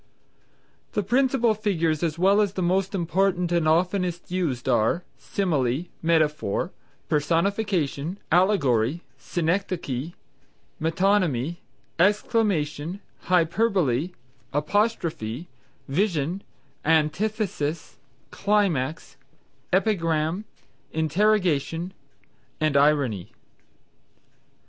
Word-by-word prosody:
The 210 - 0
principal 245 +1 +2
figures 170 -8 0
as 165 -2 -1
well 195 +4 +4
as 200 -2 0
the 185 - -2
most 190 +3 +1
important 180 0 +1
and 170 -2 +2
those 160 +2 +5
oftenest 180 -2 -4
used 155 -10 -1
are, 125 +8 +2 0.2
_Simile, 155 -4 -1
Metaphor, 155 -9 +1 0.4
Personification, 170 0 0
Allegory, 160 - +2 0.2
Synechdoche, 170 -4 -2 0.7
Metonymy, 165 -3 +1 0.4
Exclamation, 185 -5 +1 0.3
Hyperbole, 180 - +2 0.4
Apostrophe, 160 - -1 0.4
Vision, 170 +2 0 0.4
Antithesis, 160 - 0 0.3
Climax, 175 -11 0 0.5
Epigram, 175 -2 +1 0.5
Interrogation_ 170 -1 +1 0.7
and 155 -2 +1
Irony. 140 -9 +2
170 Hz, 75 wpm, -25 LUFS, 150-195 Hz, 0.7 s, those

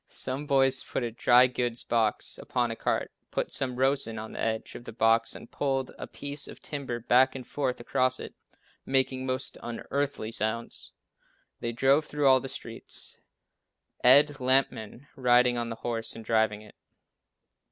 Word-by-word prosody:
Some 135 +3 -3
boys 135 -2 +3
put - - -3
a 120 - -3
dry 120 +2 +5
goods 120 -2 -1
box 110 -2 +1
upon 120 -2 -1
a - - -4
cart, - - -2 0.2
put - - -2
some 130 -2 0
rosin 130 -3 0
on 110 +1 -7
the - - -8
edge 110 0 -2
of 120 - -10
the - - -7
box 115 0 +2
and - - -11
pulled 135 -2 -1
a - - -6
piece 145 0 -3
of - - -11
timber 135 -5 -4
back 125 +3 +3
and 130 -2 -7
forth 130 -1 -2
across 130 +2 0
it, - - -8 0.5
making 130 -1 +1
most 130 0 -3
unearthly 120 0 -3
sounds. 115 +1 -1 0.7
They 115 - -3
drove 135 +5 +3
through 145 -1 -2
all 130 -1 +6
the 135 - -6
streets, 115 -2 -7 0.8
Ed 145 +3 +6
Lampman 130 -2 0
riding 125 -1 +4
on 120 -1 -2
the 115 - -4
horse 115 -2 -1
and 115 - -10
driving 110 -2 +1
it. 105 - -16
125 Hz, 165 wpm, -28 LUFS, 115-135 Hz, 0.8 s, all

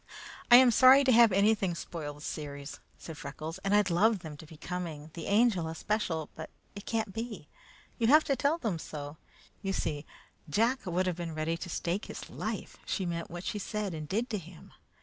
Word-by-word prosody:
"I 240 - +10
am 250 0 +8
sorry 260 +4 +7
to 265 - +4
have 235 -2 +7
anything 200 -2 +2
spoil 155 -3 -6
the 150 - -14
series," 145 -2 -6 0.2
said 160 -3 -9
Freckles, 155 +3 -6
"and 200 +1 +1
I'd 205 -3 +3
love 205 +3 +3
them 155 -2 -7
to 155 - -12
be 160 - -13
coming, 160 -3 -6
the 165 - -6
Angel 205 -5 +3
especial, 165 -2 -2
but 160 - -8 0.3
it 200 - -9
can't 220 -4 -1
be. 225 -8 -6 0.5
You'll 230 -1 +3
have 305 +3 +7
to 275 - +1
tell 285 +4 +1
them 215 - -2
so. 145 -1 -7 0.4
You 195 -1 -2
see, 150 -5 -3 0.4
Jack 230 - +1
would 180 +1 0
have 180 -2 -1
been 170 -2 -5
ready 155 +1 -1
to 175 +2 -7
stake 175 +4 -2
his - - -8
life - - -5
she 190 - -1
meant 170 -1 -3
what 175 +1 -7
she 210 - -3
said 205 -1 -3
and 155 -2 -6
did 225 +5 0
to 210 - -1
him. 170 -1 -14
180 Hz, 205 wpm, -30 LUFS, 160-220 Hz, 0.5 s, I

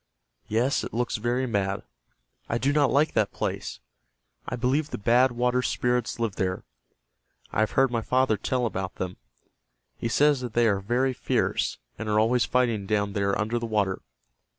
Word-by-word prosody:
Yes, 120 +6 +1
it - - -6
looks 120 -1 0
very 120 +4 0
mad. 100 -4 -1 0.7
I 115 - +1
do 140 +4 +1
not 145 -3 +3
like 150 +3 +2
that 110 -2 +1
place. - - -4 0.7
I - - -2
believe 135 +5 0
the - - -4
Bad 120 +5 +4
Water 125 +1 +1
Spirits 125 -1 0
live 115 -4 -2
there. 95 -2 -1 0.9
I - - -1
have 110 - +1
heard 135 -1 +3
my 115 -2 0
father 130 -1 +2
tell 125 +3 -1
about 95 -4 -3
them. 90 -1 -4 0.8
He 115 - -2
says 145 +2 +3
that 120 -3 -5
they 120 0 +4
are 100 -3 +2
very 125 +6 0
fierce, - - 0 0.2
and 110 -1 -4
are 105 0 +3
always 120 +3 +3
fighting 115 -6 +1
down 100 -1 0
there 100 -1 0
under 110 +3 0
the 115 - -4
water. 100 -4 0
115 Hz, 175 wpm, -26 LUFS, 105-125 Hz, 0.9 s, Bad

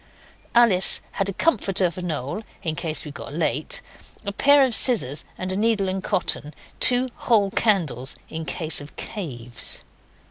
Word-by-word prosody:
Alice 215 -6 +5
had 195 0 -2
a - - -3
comforter 195 - +1
for 180 - -8
Noel 155 - -4 0.2
in 160 -2 -2
case 165 -2 -2
we 150 - -7
got 140 - -9
late, 155 -2 -2 0.4
a 200 - -2
pair 285 +7 +5
of 260 -3 +1
scissors 210 - +5
and 185 0 -3
needle 215 -3 +1
and 190 0 -3
cotton, 150 -4 -1 0.2
two 250 +1 +4
whole 205 -5 +2
candles 160 - 0
in 160 0 -6
case 160 -2 +1
of 145 - -12
caves. 120 - -4
185 Hz, 150 wpm, -23 LUFS, 155-215 Hz, 0.4 s, Alice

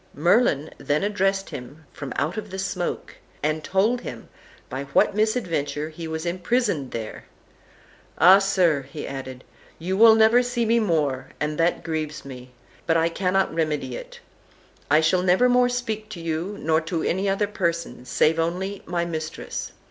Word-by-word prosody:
Merlin 160 - +2
then 150 +3 0
addressed 195 -1 0
him 145 +5 -9
from 140 -3 -7
out 155 +4 0 0.2
the 190 - -6
smoke, 185 -2 -3 0.3
and 155 +1 0
told 215 +8 +1
him - - -8 0.4
by 135 +1 -5
what 140 +7 +2
misadventure 170 - -1
he 160 +1 -7
was 160 +1 -4
imprisoned 175 - 0
there. 110 -2 -6 0.9
"Ah, 185 +5 +8
sir!" 185 -7 +2
he 145 +1 -6
added, 130 -2 -7 0.3
"you 180 +4 -2
will 220 +2 +8
never 220 +2 +5
see 245 -1 -1
me 230 +1 +3
more, 150 - 0
and 150 +1 -2
that 165 +1 +1
grieves 155 -3 -4
me, 125 -2 -10 0.4
but 165 -1 +3
I 165 +1 +2
cannot 190 +2 0
remedy 150 -6 -1
it; - - -9 0.7
I 155 +2 +5
shall 170 +3 +3
never 185 +7 +4
more 245 0 +4
speak 220 -3 -3
to 205 -5 -7
you, 165 +5 -3
nor 160 +1 +2
to 165 0 -3
any 190 +3 0
other 195 +2 +1
person, 170 -9 -2
save 155 +5 +2
only 185 +4 -2
my 170 0 -1
mistress. 160 -2 -5
170 Hz, 160 wpm, -24 LUFS, 155-195 Hz, 0.9 s, Ah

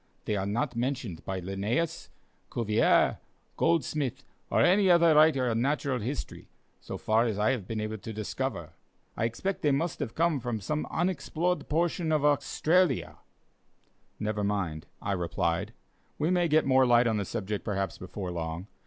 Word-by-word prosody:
They 105 - 0
are 95 -1 -1
not 120 +6 -1
mentioned 120 -7 -3
by 95 -1 -3
Linnæus, 100 - -2 0.4
Cuvier, 110 -2 +2 0.4
Goldsmith, 140 -5 0 0.3
or - - +2
any 190 +2 +4
other 170 -2 +6
writer 150 -4 +5
on 115 -1 +1
natural 140 -1 0
history, 125 +6 -5 0.3
so - - -7
far 110 +2 +2
as 110 -3 -2
I 105 +5 +3
have 115 -8 -3
been 110 -1 -3
able 110 0 -3
to 110 - -7
discover. 110 -1 -4 0.4
I 115 - 0
expect 180 - -2
they 150 - +2
must 150 +4 0
have 115 - -4
come 165 -3 +2
from 120 -2 -3
some 150 +10 -2
unexplored 175 0 -1
portion 165 +1 0
of 150 -2 +2
Australia." 155 +2 +2 1.0
"Never 105 -1 -1
mind," 95 -7 -2 0.2
I - - -1
replied, 90 +2 -1 0.5
"we 155 +4 +1
may 175 -1 +3
get 155 0 +3
more 130 -1 +4
light 120 0 +5
on 110 -2 +1
the 100 - 0
subject, 105 +1 -4
perhaps, 100 -2 -2
before 95 0 -6
long. 85 +1 -4
120 Hz, 160 wpm, -29 LUFS, 105-155 Hz, 1.0 s, other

